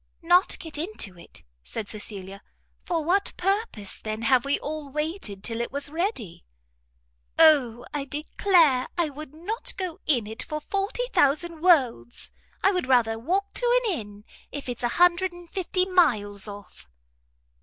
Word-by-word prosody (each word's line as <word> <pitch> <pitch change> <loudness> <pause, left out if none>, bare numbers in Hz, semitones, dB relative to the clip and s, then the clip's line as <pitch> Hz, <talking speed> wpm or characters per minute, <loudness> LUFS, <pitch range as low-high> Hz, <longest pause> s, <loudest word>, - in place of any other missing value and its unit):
"Not 355 +3 +4
get 320 -3 -6
into 315 - -4
it?" - - -14 0.2
said 220 -3 -5
Cecilia, 200 -2 -7 0.4
"for 335 -3 -1
what 390 +4 +2
purpose, 390 - -2
then, 215 +1 -4
have 245 +2 +4
we 280 - +2
all 300 -1 -5
waited 300 - -3
till 230 0 -2
it 235 - -3
was 280 +1 -1
ready?" 320 - -3 0.9
"O, 260 -7 +5
I 290 -2 -2
declare 300 -1 +3
I 335 -4 +1
would 300 +1 -9
not 440 +9 -4
go 365 -4 -4
in 245 -8 +4
it 220 +2 -6
for 305 - -4
forty 395 +9 -1
thousand 315 +3 +2
worlds. 255 - +2 0.3
I 390 - +5
would 360 -8 -1
rather 230 -4 +3
walk 380 - -1
to - - +3
an 420 - +2
inn, 205 -1 -11 0.3
if 285 -2 -6
it's 245 -2 -4
a 240 - +2
hundred 355 +1 +4
and 350 0 -12
fifty 365 0 0
miles 220 - +2
off." 200 - -11
300 Hz, 155 wpm, -26 LUFS, 230-355 Hz, 0.9 s, O